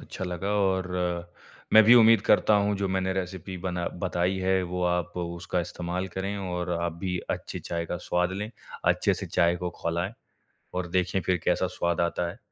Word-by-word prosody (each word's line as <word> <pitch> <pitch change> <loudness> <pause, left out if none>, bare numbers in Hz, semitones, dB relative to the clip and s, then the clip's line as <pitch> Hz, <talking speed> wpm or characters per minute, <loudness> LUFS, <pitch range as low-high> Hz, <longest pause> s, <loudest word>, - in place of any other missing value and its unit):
अच्छा 95 - -6
लगा 90 +2 -3
और 95 -1 +1 0.8
मैं 110 - +10
भी 115 +3 +8
उम्मीद 115 -1 +7
करता 105 - +5
हूँ 100 0 +2
जो 100 0 -1
मैंने 95 0 0
रेसिपी 95 0 -4
बना 90 -1 -3 0.2
बताई 90 0 0
है। 95 0 +2
वो 90 0 -3
आप 90 -1 0
उसका 85 +1 -2
इस्तेमाल 90 +1 -3
करें 95 +2 -3
और 90 -2 -3
आप 85 0 -1
भी 90 0 -2
अच्छी - - -4
चाय 85 0 -3
का 90 - -3
स्वाद 90 +1 0
लें, 105 +3 -4 0.3
अच्छे-से - - +2
चाय 85 0 +2
को 90 0 -3
खौलाएँ 85 +5 -2 0.6
और 90 -1 -1
देखें 90 +1 +1
फ़िर 90 +1 +1
कैसा 90 +1 +2
स्वाद 85 -2 -1
आता 85 0 0
है। - - -12
90 Hz, 180 wpm, -27 LUFS, 90-95 Hz, 0.8 s, मैं